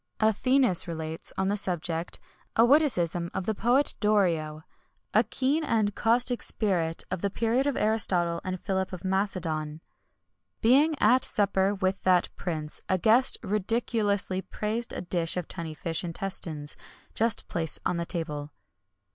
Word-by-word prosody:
Athenæus 220 Hz, -1 st, +3 dB
relates, 160 Hz, -1 st, -4 dB
on 190 Hz, -, 0 dB
this 205 Hz, +1 st, +2 dB
subject, 170 Hz, -2 st, -2 dB, 0.4 s
a 230 Hz, -, +6 dB
witticism 180 Hz, -, +2 dB
of 185 Hz, -, -2 dB
the 220 Hz, -, 0 dB
poet 245 Hz, +7 st, +2 dB
Dorio, 170 Hz, -8 st, +1 dB, 0.5 s
a -, -, +5 dB
keen 280 Hz, +5 st, 0 dB
and 215 Hz, -7 st, +1 dB
caustic 240 Hz, +3 st, +2 dB
spirit 170 Hz, -6 st, 0 dB
of 185 Hz, -2 st, -3 dB
the 200 Hz, -, 0 dB
period 230 Hz, +6 st, 0 dB
of 285 Hz, -, -1 dB
Aristotle 180 Hz, -6 st, +1 dB
and 185 Hz, 0 st, -4 dB
Philip 190 Hz, -1 st, -2 dB
of 185 Hz, +1 st, -7 dB
Macedon. 165 Hz, -6 st, -2 dB, 0.8 s
Being 285 Hz, +7 st, +4 dB
at 250 Hz, +5 st, +4 dB
supper 200 Hz, -2 st, +1 dB
with 190 Hz, 0 st, -1 dB
that 180 Hz, -1 st, +3 dB
prince, 155 Hz, -4 st, -4 dB
a 185 Hz, -, +3 dB
guest 230 Hz, +7 st, +4 dB
ridiculously 205 Hz, -2 st, 0 dB
praised 220 Hz, +4 st, -4 dB
a -, -, -4 dB
dish 175 Hz, -1 st, 0 dB
of 180 Hz, -, -3 dB
tunny 165 Hz, -3 st, -6 dB
fish 165 Hz, +2 st, -2 dB
intestines, 165 Hz, -4 st, -3 dB, 0.4 s
just 230 Hz, -1 st, 0 dB
placed 160 Hz, -2 st, +1 dB
on 175 Hz, -, 0 dB
the 170 Hz, -, -1 dB
table. 150 Hz, -4 st, -3 dB
190 Hz, 145 wpm, -27 LUFS, 170-225 Hz, 0.8 s, a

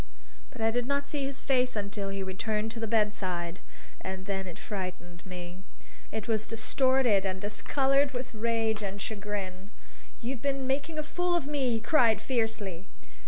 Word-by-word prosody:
But 230 Hz, -, -9 dB
I 225 Hz, 0 st, +4 dB
did 245 Hz, +1 st, 0 dB
not 280 Hz, 0 st, +1 dB
see 285 Hz, -2 st, -1 dB
his 275 Hz, 0 st, -3 dB
face 255 Hz, -2 st, +2 dB
until 200 Hz, -1 st, -2 dB
he 195 Hz, 0 st, -2 dB
returned 210 Hz, +3 st, -1 dB
to 230 Hz, -, -5 dB
the 225 Hz, -, -1 dB
bedside. 190 Hz, -5 st, 0 dB, 0.4 s
And 190 Hz, 0 st, -4 dB
then 190 Hz, -1 st, -2 dB
it 175 Hz, -, -7 dB
frightened 185 Hz, -3 st, -5 dB
me. 180 Hz, 0 st, -7 dB, 0.5 s
It 220 Hz, -1 st, -3 dB
was 220 Hz, -2 st, +1 dB
distorted 240 Hz, -2 st, +3 dB
and 190 Hz, -1 st, -1 dB
discolored 270 Hz, +7 st, +2 dB
with 250 Hz, -2 st, -4 dB
rage 225 Hz, -1 st, +1 dB
and 200 Hz, 0 st, -3 dB
chagrin. 200 Hz, -2 st, -4 dB, 0.5 s
"You've 245 Hz, 0 st, -3 dB
been 275 Hz, -1 st, 0 dB
making 280 Hz, +4 st, 0 dB
a 305 Hz, -, 0 dB
fool 355 Hz, +3 st, +1 dB
of 340 Hz, -, +1 dB
me!" 285 Hz, -3 st, +1 dB
he 230 Hz, -1 st, +2 dB
cried 230 Hz, -3 st, +5 dB
fiercely. 220 Hz, -7 st, -1 dB
220 Hz, 165 wpm, -30 LUFS, 195-260 Hz, 0.5 s, cried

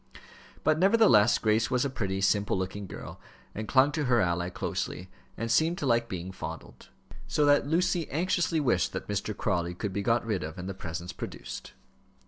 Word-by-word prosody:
But, 155 Hz, 0 st, +3 dB
nevertheless, 125 Hz, -, +5 dB
Grace 110 Hz, +1 st, +1 dB
was 125 Hz, +1 st, +1 dB
a -, -, +2 dB
pretty, 95 Hz, -6 st, -2 dB
simple 100 Hz, 0 st, +2 dB
looking 95 Hz, +2 st, -4 dB
girl, -, -, -9 dB, 0.3 s
and 110 Hz, +1 st, -5 dB
clung 135 Hz, +4 st, +4 dB
to 150 Hz, 0 st, -1 dB
her 120 Hz, -2 st, +3 dB
ally 85 Hz, -1 st, 0 dB
closely, 95 Hz, 0 st, -4 dB, 0.3 s
and 115 Hz, +1 st, -2 dB
seemed 160 Hz, +7 st, +3 dB
to -, -, -3 dB
like 115 Hz, -2 st, +2 dB
being 90 Hz, 0 st, -5 dB
fondled. 80 Hz, -3 st, -8 dB, 0.4 s
So 150 Hz, -, +2 dB
that 145 Hz, -1 st, +4 dB
Lucy 175 Hz, +1 st, +1 dB
anxiously 170 Hz, +1 st, +1 dB
wished 120 Hz, -, +1 dB
that -, -, -5 dB
Mr. 105 Hz, +1 st, -3 dB
Crawley 90 Hz, -3 st, -1 dB
could 100 Hz, +1 st, -4 dB
be 100 Hz, -, -1 dB
got 115 Hz, +3 st, +1 dB
rid 105 Hz, -5 st, -1 dB
of 80 Hz, +2 st, -6 dB
and 90 Hz, 0 st, -6 dB
the 95 Hz, -, -3 dB
presents 85 Hz, -1 st, -6 dB
produced. -, -, -7 dB
110 Hz, 185 wpm, -28 LUFS, 95-140 Hz, 0.4 s, nevertheless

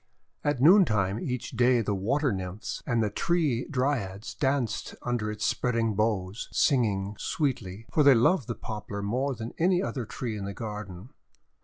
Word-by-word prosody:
At 145 Hz, -3 st, 0 dB
noontime 115 Hz, -, +5 dB
each 125 Hz, -1 st, -4 dB
day 125 Hz, 0 st, +3 dB
the 105 Hz, -1 st, -1 dB
Water 130 Hz, +9 st, +1 dB
Nymphs 95 Hz, +1 st, -5 dB
and 115 Hz, -3 st, +2 dB
the 105 Hz, -, -1 dB
Tree 155 Hz, -, 0 dB
Dryads 125 Hz, -8 st, -1 dB
danced 135 Hz, -6 st, -1 dB
under 120 Hz, -3 st, -1 dB
its 105 Hz, 0 st, -3 dB
spreading 115 Hz, -3 st, +1 dB
boughs, 105 Hz, -1 st, -1 dB
singing 105 Hz, -7 st, +1 dB
sweetly, 115 Hz, -, -2 dB
for 155 Hz, -, +3 dB
they 140 Hz, -2 st, +7 dB
loved 120 Hz, -, +3 dB
the 120 Hz, -, -3 dB
Poplar 105 Hz, -2 st, -6 dB
more 130 Hz, +6 st, -1 dB
than 115 Hz, 0 st, -6 dB
any 180 Hz, +2 st, +3 dB
other 125 Hz, -, -3 dB
tree 120 Hz, -4 st, -4 dB
in 100 Hz, -2 st, -5 dB
the 100 Hz, 0 st, -5 dB
garden. 105 Hz, -2 st, -7 dB
115 Hz, 160 wpm, -28 LUFS, 105-135 Hz, -, they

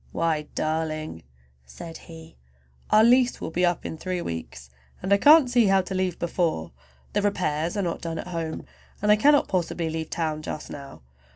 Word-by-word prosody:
"Why 155 Hz, -2 st, -1 dB
darling!" 155 Hz, -, -2 dB, 0.4 s
said 115 Hz, -, -10 dB
he, 160 Hz, 0 st, -12 dB, 0.5 s
"our 215 Hz, -, +6 dB
lease 245 Hz, +1 st, +4 dB
will -, -, -5 dB
be 180 Hz, +2 st, 0 dB
up 175 Hz, -1 st, +1 dB
in 160 Hz, -, -5 dB
three 185 Hz, -1 st, -3 dB
weeks, 80 Hz, -, -7 dB, 0.3 s
and 190 Hz, +2 st, +1 dB
I -, -, +6 dB
can't 295 Hz, +5 st, +7 dB
see 245 Hz, -3 st, +3 dB
how 195 Hz, 0 st, +4 dB
to 185 Hz, +1 st, -6 dB
leave 185 Hz, -2 st, -1 dB
before. 165 Hz, -, -1 dB, 0.4 s
"The 205 Hz, -, +1 dB
repairs 175 Hz, -4 st, -1 dB
are 200 Hz, -, 0 dB
not 170 Hz, -2 st, -3 dB
done 165 Hz, -1 st, -4 dB
at 180 Hz, -, -6 dB
home, 165 Hz, -2 st, -4 dB, 0.4 s
and 210 Hz, -, +4 dB
I -, -, +8 dB
cannot 285 Hz, +6 st, +4 dB
possibly 170 Hz, -3 st, -1 dB
leave 160 Hz, 0 st, -4 dB
town 155 Hz, -2 st, -2 dB
just 155 Hz, -, -6 dB
now. 140 Hz, -, -10 dB
170 Hz, 185 wpm, -25 LUFS, 155-195 Hz, 0.5 s, I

